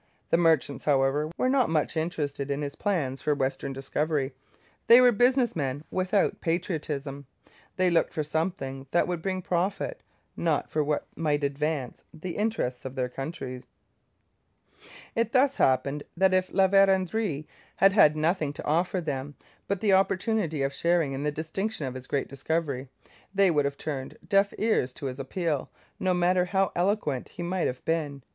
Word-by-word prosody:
The - - +5
merchants, 160 -5 +2
however, 145 +1 +2
were - - +1
not 260 -2 +3
much 155 0 0
interested 150 -4 -2
in 140 +1 -1
his 140 0 -4
plans 150 -10 -1
for 150 - +1
western 135 0 -2
discovery. 135 +1 -1 0.5
They 235 +2 +9
were 250 -1 +7
business 245 +2 +3
men 140 -2 -2
without 185 +2 +1
patriotism; 150 -5 -3 0.5
they 185 -1 +2
looked 170 - +2
for 155 - -2
something 145 -4 -3
that 175 - +2
would 175 -2 -2
bring 185 0 -2
profit, 190 - -1 0.3
not 160 -3 0
for 155 - +1
what 150 0 -1
might 150 -2 0
advance 140 -2 -2
the 170 +2 -6
interests 205 - -1
of 130 0 -6
their 125 -2 -1
country. 135 -2 -6 1.5
It 230 0 0
thus 275 +1 +3
happened 135 +3 +2 0.2
that 190 +1 +4
if 185 0 +1
La 190 0 +4
Vérendrye 190 -4 +2 0.3
had 195 - +5
had 155 -7 +6
nothing 155 -2 0
to - - -8
offer 175 +4 +1
them 145 -2 -4 0.3
but 200 -2 -1
the 205 -3 +3
opportunity 190 - +1
of 135 0 -1
sharing 170 -3 +1
in 135 - -4
the 150 +1 0
distinction 160 +4 -3
of 130 - -4
his 130 -1 -9
great 140 - -1
discovery, 140 -1 -2 0.5
they 195 -2 +5
would 145 -3 +2
have 140 0 -2
turned 135 -4 -5
deaf 200 0 +3
ears 210 - +1
to 145 - -8
his 130 0 -4
appeal, 150 +1 -2 0.3
no 185 -1 +1
matter 180 +1 +3
how 195 +1 +1
eloquent 175 - 0
he 175 - -7
might 180 +1 0
have 125 - -5
been. 150 -5 -1
160 Hz, 165 wpm, -27 LUFS, 140-185 Hz, 1.5 s, They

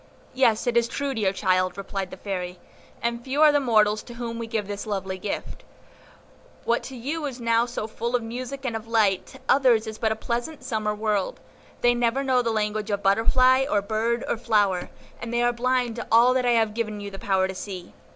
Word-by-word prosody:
"Yes, 245 -4 +3
it 245 -1 0
is 235 0 +4
true, 280 +3 -2
dear 210 -6 +1
child," 185 -2 +1
replied 195 -1 -4
the - - -9
Fairy, 180 -3 -4 0.5
"and 235 0 -1
few 275 +4 +2
are 305 - +8
the 290 - +3
mortals 215 -5 +3
to 240 - -11
whom 235 -1 -5
we 230 - -4
give 220 -3 -2
this 205 +1 -5
lovely 190 -2 -3
gift; 200 - -5 1.0
what 235 +1 +2
to 265 - -8
you 290 +7 -4
is 260 -2 -7
now 230 0 +2
so 235 -3 -4
full 235 +2 -3
of 240 - 0
music 255 +4 -6
and 235 -3 -1
of 225 0 -5
light, 215 -5 +2
to 265 - -13
others 250 -5 +4
is 220 0 -7
but 220 -1 +1
a - - 0
pleasant 240 +6 -4
summer 215 -4 -1
world; 210 -2 -1 0.4
they 240 0 +5
never 240 +3 +1
know 260 -2 +3
the 235 - -1
language 215 -1 -1
of 205 -1 -1
butterfly 255 +6 +4
or 205 - +3
bird 220 +4 -1
or - - 0
flower, 205 -6 +1 0.3
and 235 - -5
they 240 0 +1
are 240 0 +3
blind 245 -1 0
to 235 - -5
all 235 +3 +6
that 255 -1 +1
I 240 - +4
have 225 -2 +2
given 215 -2 -3
you 205 0 -6
the 195 - -8
power 190 -1 +1
to 190 - -5
see. 185 -2 -7
230 Hz, 220 wpm, -25 LUFS, 210-245 Hz, 1.0 s, are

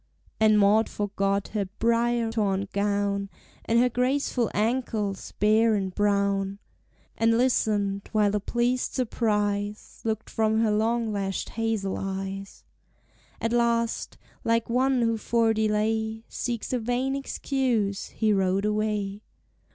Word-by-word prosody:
And 215 -1 +5
Maud 210 +2 +4
forgot 200 -1 -1
her 210 -2 -1
brier 235 0 +1
torn 200 -3 0
gown, 200 0 0 0.4
And 230 - +2
her 245 +1 +5
graceful 250 -1 0
ankles, 215 -3 -1
bare 220 +2 +3
and 190 -2 -2
brown, 200 -1 +1 0.6
And 230 0 +3
listened, 205 -5 +1
while 210 -2 +2
a - - +2
pleased 240 +4 0
surprise 210 -4 -1
Looked 220 -1 -2
from 220 0 +1
her 220 -2 +2
long 225 +1 +1
lashed 195 -2 -2
hazel 220 -4 -2
eyes. 195 0 -5 0.8
At 230 +1 -1
last, 235 -1 0 0.3
like 230 0 +1
one 255 0 +2
who 230 -1 +1
for 225 0 +2
delay 220 +1 0
Seeks 240 0 -3
a 250 - +1
vain 245 +4 -1
excuse, 250 -7 -1
he 215 -2 +1
rode 195 0 +1
away. 210 -1 -1
220 Hz, 125 wpm, -26 LUFS, 200-230 Hz, 0.8 s, And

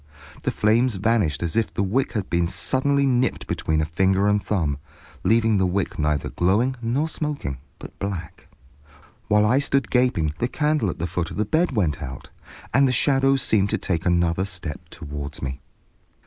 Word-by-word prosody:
The - - -1
flames 115 +2 +2
vanished 95 - +1
as 85 -2 -2
if 115 -2 +1
the 100 - -1
wick 120 +8 0
had 105 -5 -2
been 85 0 +1
suddenly 140 +8 +1
nipped 125 -2 +1
between 80 0 -1
a - - 0
finger 95 +5 +2
and 105 0 +2
thumb, 80 -9 -1 0.4
leaving 115 -2 +3
the 95 - +2
wick 90 -1 -2
neither 75 -1 0
glowing 105 +9 +1
nor 125 +7 0
smoking, 145 - -3 0.2
but - - -12
black. 90 -5 -5 0.8
While 105 0 +4
I 125 +6 +4
stood 135 -5 0
gaping 125 - +2
the 120 - +1
candle 150 -5 0
at - - -4
the 85 - -2
foot 85 0 -2
of - - -8
the 105 - +1
bed 160 - +1
went 85 - 0
out, 65 -1 -8 0.4
and 135 +3 +5
the - - +2
shadows 135 +1 +3
seemed 100 -2 +2
to - - 0
take 85 -3 -2
another 85 +1 +2
step 90 -6 -6
toward 75 +1 -7
me. 65 0 -5
100 Hz, 180 wpm, -23 LUFS, 85-125 Hz, 0.8 s, and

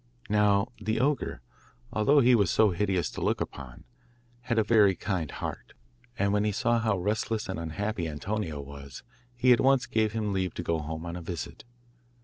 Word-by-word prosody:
Now 105 +1 +3
the 110 +1 -1
ogre, 140 +3 0 0.5
although 140 +7 +4
he 125 0 +5
was 100 -7 +4
so 110 -2 +4
hideous 95 -1 0
to - - -7
look - - +1
upon, 65 -3 -7 0.6
had 120 -1 -2
a 110 - +4
very 105 -3 +4
kind 90 -7 -2
heart, - - -6 0.4
and 100 +1 +1
when 105 0 +2
he 105 - +1
saw 120 +3 +1
how 110 -3 +1
restless 105 +3 -1
and 95 -3 -4
unhappy 85 +3 -3
Antonio 80 0 -3
was, 70 -2 -10 0.3
he 125 +1 +5
at 120 - +2
once 135 -1 +4
gave 110 -4 0
him 105 -2 -1
leave 95 -1 -1
to 85 - -4
go 85 -1 0
home 80 +2 -5
on 85 0 -5
a 90 - -6
visit. 85 +5 -6
105 Hz, 185 wpm, -28 LUFS, 85-110 Hz, 0.6 s, he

